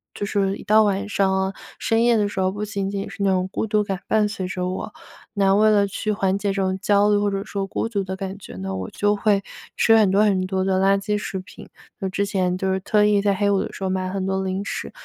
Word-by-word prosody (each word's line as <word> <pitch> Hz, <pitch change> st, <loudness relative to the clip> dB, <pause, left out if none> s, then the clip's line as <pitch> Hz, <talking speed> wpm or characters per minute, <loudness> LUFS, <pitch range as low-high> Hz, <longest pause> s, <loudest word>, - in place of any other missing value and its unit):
就 205 Hz, -, -3 dB
是 200 Hz, -1 st, 0 dB
一 -, -, -11 dB
到 215 Hz, +1 st, +5 dB
晚 205 Hz, 0 st, 0 dB
上 195 Hz, -2 st, +1 dB
啊、 190 Hz, 0 st, 0 dB, 0.2 s
深 225 Hz, 0 st, +1 dB
夜 235 Hz, -1 st, +4 dB
的 205 Hz, -1 st, +2 dB
时 205 Hz, -, -5 dB
候， 185 Hz, 0 st, +1 dB
不 205 Hz, +2 st, -4 dB
仅 200 Hz, -1 st, -3 dB
仅 200 Hz, 0 st, -4 dB
是 -, -, -9 dB
那 195 Hz, -, +3 dB
种 185 Hz, -1 st, +1 dB
孤 220 Hz, -, -2 dB
独 210 Hz, 0 st, +2 dB
感 195 Hz, -2 st, -3 dB
伴 215 Hz, -1 st, +3 dB
随 195 Hz, -3 st, -4 dB
着 180 Hz, -1 st, -3 dB
我。 185 Hz, -, -5 dB, 0.5 s
那 195 Hz, -1 st, +4 dB
为 215 Hz, +2 st, +5 dB
了 205 Hz, -1 st, +4 dB
去 215 Hz, +2 st, -3 dB
缓 195 Hz, -2 st, 0 dB
解 200 Hz, +1 st, -1 dB
这 195 Hz, -, -3 dB
种 190 Hz, 0 st, -1 dB
焦 205 Hz, +1 st, +3 dB
虑 205 Hz, -, +4 dB
或 205 Hz, 0 st, +1 dB
者 195 Hz, 0 st, -3 dB
说 200 Hz, -2 st, -3 dB
孤 210 Hz, -, -2 dB
独 205 Hz, -4 st, -2 dB
的 190 Hz, 0 st, -5 dB
感 195 Hz, 0 st, -6 dB
觉 190 Hz, -, -11 dB
呢， 95 Hz, +1 st, -4 dB
我 95 Hz, 0 st, -5 dB
就 205 Hz, 0 st, +1 dB
会 200 Hz, -1 st, +1 dB, 0.3 s
吃 225 Hz, -, +4 dB
很 215 Hz, -3 st, +5 dB
多 200 Hz, +3 st, +4 dB
很 190 Hz, -3 st, +2 dB
多 190 Hz, 0 st, -1 dB
的 190 Hz, -1 st, +1 dB
垃 195 Hz, +1 st, +4 dB
圾 210 Hz, +1 st, -1 dB
食 205 Hz, -2 st, -4 dB
品。 185 Hz, -, -13 dB, 0.3 s
那 195 Hz, -3 st, -2 dB
之 200 Hz, +2 st, -1 dB
前 185 Hz, -3 st, 0 dB
就 190 Hz, 0 st, 0 dB
是 190 Hz, -, -1 dB
特 210 Hz, +2 st, +2 dB
意 205 Hz, -1 st, +3 dB
在 200 Hz, -1 st, +2 dB
黑 200 Hz, +1 st, +1 dB
五 195 Hz, -, +2 dB
的 -, -, -5 dB
时 195 Hz, -, -8 dB
候 190 Hz, -, 0 dB
买 185 Hz, 0 st, -2 dB
很 190 Hz, 0 st, -3 dB
多 190 Hz, 0 st, -1 dB
零 190 Hz, +1 st, -3 dB
食， -, -, -5 dB
195 Hz, 300 characters per minute, -22 LUFS, 190-205 Hz, 0.5 s, 到